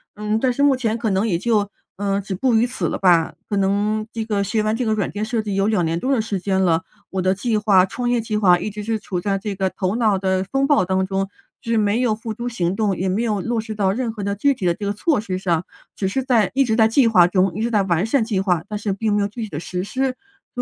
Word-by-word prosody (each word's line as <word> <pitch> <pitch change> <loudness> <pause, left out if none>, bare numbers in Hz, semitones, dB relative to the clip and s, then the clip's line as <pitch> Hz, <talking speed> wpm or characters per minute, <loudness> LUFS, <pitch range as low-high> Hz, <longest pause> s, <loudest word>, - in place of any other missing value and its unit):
嗯， 210 +1 -1
但 255 +1 +2
是 250 - -2
目 285 -2 +5
前 230 -3 -1
可 230 -2 -1
能 190 +2 +1
也 175 -6 +1
就， 210 0 +1 0.3
嗯， 200 0 -1
止 195 -1 -5
步 245 +5 +1
于 225 +2 +3
此 250 - -4
了 - - -1
吧， 175 -4 +3 0.2
可 205 - -1
能 205 +2 +1
这 225 -1 -4
个 205 -3 0
学 215 +3 0
完 215 +1 0
这 250 - -2
个 220 - +1
软 210 - -1
件 210 - -4
设 230 0 -1
计 205 -2 -3
有 195 +1 +2
2 210 -6 +1
年 165 +1 -1
多 265 +8 0
的 235 - +2
时 210 -3 -3
间 190 +1 0
了， 170 -2 +2 0.3
我 190 -1 -1
的 185 +1 +2
计 215 +3 -1
划 200 -3 +4
创 240 +5 -3
业 245 - +2
计 220 -1 -3
划 180 -4 +4
一 210 - -3
直 210 0 -7
是 220 +1 -1
处 185 -4 -4
在 195 0 0
这 205 0 -4
个 190 0 0
头 185 +1 -2
脑 220 -4 +2
的 190 0 0
风 270 +8 0
暴 290 -8 +4
当 190 +1 0
中， 195 0 -2 0.3
是 230 0 -1
没 210 +2 +2
有 240 -3 +2
付 220 +1 -5
诸 235 +3 -4
行 180 -6 -1
动， 205 -2 0
也 190 - -1
没 195 +5 0
有 215 -3 0
落 235 +2 -1
实 220 0 -6
到 200 -3 +1
任 240 0 -2
何 215 -2 -7
的 200 0 -2
具 280 +8 +2
体 215 -8 -5
的 175 - +3
这 210 - -6
个 200 - 0
措 230 +4 0
施 185 -4 -3
上。 175 -3 0 0.3
只 195 - -1
是 265 +6 -1
在 235 -6 +2
一 270 +1 +3
直 220 - +1
在 220 -1 +5
计 240 +2 +4
划 185 -6 +6
中， 185 0 +1
一 215 - -3
直 235 +1 -1
在 210 -2 +3
完 175 0 +1
善 230 +2 +2
计 215 -4 -1
划， 180 -4 0
但 210 - -4
是 205 -1 -2
并 210 +2 -1
没 205 - +2
有 200 - +1
具 225 +2 -6
体 - - -4
的 150 -4 -5
实 180 +1 -4
施， 260 +3 -1 0.4
所 245 - -3
210 Hz, 315 characters per minute, -21 LUFS, 190-225 Hz, 0.4 s, 划